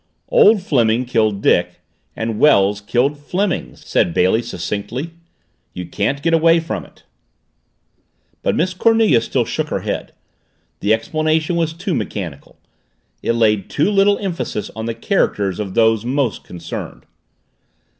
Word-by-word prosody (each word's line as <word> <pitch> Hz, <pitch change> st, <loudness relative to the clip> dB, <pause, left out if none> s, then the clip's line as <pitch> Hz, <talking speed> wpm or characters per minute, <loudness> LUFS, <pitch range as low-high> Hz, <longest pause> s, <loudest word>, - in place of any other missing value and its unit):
"Old 225 Hz, -, +5 dB
Fleming 120 Hz, -, +2 dB
killed 110 Hz, -4 st, 0 dB
Dick 90 Hz, 0 st, +2 dB, 0.4 s
and 110 Hz, -1 st, -3 dB
Wells 105 Hz, -8 st, +4 dB
killed 130 Hz, +8 st, 0 dB
Fleming," 175 Hz, -, -2 dB
said 85 Hz, -, -1 dB
Bailey 95 Hz, +6 st, +3 dB
succinctly. 120 Hz, +8 st, -5 dB, 0.6 s
"You 90 Hz, -, -5 dB
can't 135 Hz, -, -2 dB
get 165 Hz, +1 st, +1 dB
away 165 Hz, +1 st, +5 dB
from 165 Hz, -, -4 dB
it!" -, -, -20 dB, 1.4 s
But -, -, 0 dB
Miss 180 Hz, +3 st, 0 dB
Cornelia 220 Hz, -, +3 dB
still -, -, -1 dB
shook -, -, -2 dB
her -, -, -2 dB
head. -, -, -4 dB, 0.7 s
The 100 Hz, -, 0 dB
explanation 155 Hz, +8 st, 0 dB
was 165 Hz, -1 st, 0 dB
too 180 Hz, +3 st, -3 dB
mechanical. 85 Hz, -, -5 dB, 0.6 s
It -, -, 0 dB
laid 105 Hz, -4 st, +1 dB
too 155 Hz, +8 st, +1 dB
little 200 Hz, 0 st, +4 dB
emphasis 170 Hz, -, -4 dB
on 110 Hz, +1 st, -4 dB
the 115 Hz, -, -3 dB
characters 105 Hz, -, 0 dB
of 100 Hz, -3 st, -4 dB
those 110 Hz, -1 st, +3 dB
most 125 Hz, -, -1 dB
concerned. 85 Hz, -1 st, -8 dB
120 Hz, 135 wpm, -19 LUFS, 105-165 Hz, 1.4 s, Old